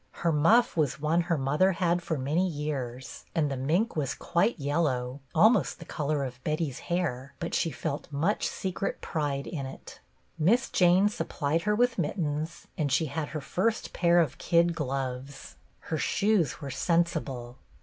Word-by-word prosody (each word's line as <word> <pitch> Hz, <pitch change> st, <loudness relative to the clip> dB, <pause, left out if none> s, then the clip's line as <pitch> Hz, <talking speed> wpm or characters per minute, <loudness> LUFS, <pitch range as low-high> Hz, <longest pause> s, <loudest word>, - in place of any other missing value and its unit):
Her 170 Hz, -, +4 dB
muff 190 Hz, +11 st, +4 dB
was 155 Hz, -2 st, 0 dB
one 155 Hz, +3 st, +2 dB
her 170 Hz, -1 st, 0 dB
mother 150 Hz, +8 st, +2 dB
had 175 Hz, 0 st, +1 dB
for 165 Hz, -2 st, -2 dB
many 150 Hz, +8 st, +1 dB
years, 140 Hz, -6 st, -4 dB
and 150 Hz, -4 st, +1 dB
the -, -, -1 dB
mink 165 Hz, -, 0 dB
was 145 Hz, -4 st, -1 dB
quite 175 Hz, +7 st, +1 dB
yellow, 140 Hz, -4 st, -1 dB, 0.2 s
almost 220 Hz, +9 st, +4 dB
the 165 Hz, -, -11 dB
color 150 Hz, -1 st, -1 dB
of 125 Hz, -1 st, -7 dB
Betty's 150 Hz, -4 st, -1 dB
hair, 140 Hz, -7 st, -2 dB
but 170 Hz, -, -4 dB
she 165 Hz, -, +1 dB
felt 150 Hz, 0 st, -4 dB
much 160 Hz, +9 st, 0 dB
secret 190 Hz, +1 st, -3 dB
pride 145 Hz, -3 st, -2 dB
in 140 Hz, -5 st, -4 dB
it. 135 Hz, -, -11 dB, 0.4 s
Miss 220 Hz, +11 st, +3 dB
Jane 180 Hz, +2 st, +5 dB
supplied 165 Hz, -8 st, -1 dB
her 210 Hz, -, +3 dB
with 240 Hz, -1 st, +2 dB
mittens, 155 Hz, -1 st, -2 dB
and 145 Hz, -3 st, 0 dB
she 160 Hz, -, +3 dB
had 155 Hz, -1 st, -2 dB
her 155 Hz, -, -5 dB
first 185 Hz, +10 st, -1 dB
pair 175 Hz, 0 st, +4 dB
of 145 Hz, -6 st, 0 dB
kid 170 Hz, 0 st, +3 dB
gloves. 135 Hz, -2 st, -4 dB, 0.3 s
Her 160 Hz, -, -3 dB
shoes 200 Hz, -, +1 dB
were 140 Hz, -2 st, -5 dB
sensible. 145 Hz, -8 st, -1 dB
155 Hz, 165 wpm, -28 LUFS, 140-175 Hz, 0.4 s, Jane